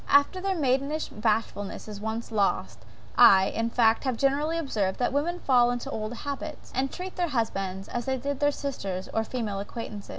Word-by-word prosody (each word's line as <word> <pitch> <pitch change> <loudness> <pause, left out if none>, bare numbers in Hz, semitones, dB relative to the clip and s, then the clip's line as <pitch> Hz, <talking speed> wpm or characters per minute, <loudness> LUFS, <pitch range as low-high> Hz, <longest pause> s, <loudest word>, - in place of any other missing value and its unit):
After 285 +6 +4
their 385 0 0
maidenish 280 +1 0
bashfulness 215 -2 -1
is 205 -1 -7
once 220 +2 -4
lost, 205 -3 0 0.4
I, 190 0 +8
in 230 0 -1
fact, 230 -1 +3
have 260 -4 -1
generally 290 +5 +1
observed, 215 - -1
that 250 - 0
women 340 +5 0
fall 245 -3 +4
into 245 -1 -3
old 215 0 -3
habits; 285 +4 -6
and 265 +1 0
treat 365 +1 -7
their 350 -1 +1
husbands 195 -7 -2
as 240 0 -3
they 265 0 0
did 280 +2 -3
their 290 0 +3
sisters 200 -11 -4
or 225 - +1
female 220 -4 -3
acquaintance. 205 0 -7
245 Hz, 185 wpm, -27 LUFS, 215-285 Hz, 0.4 s, I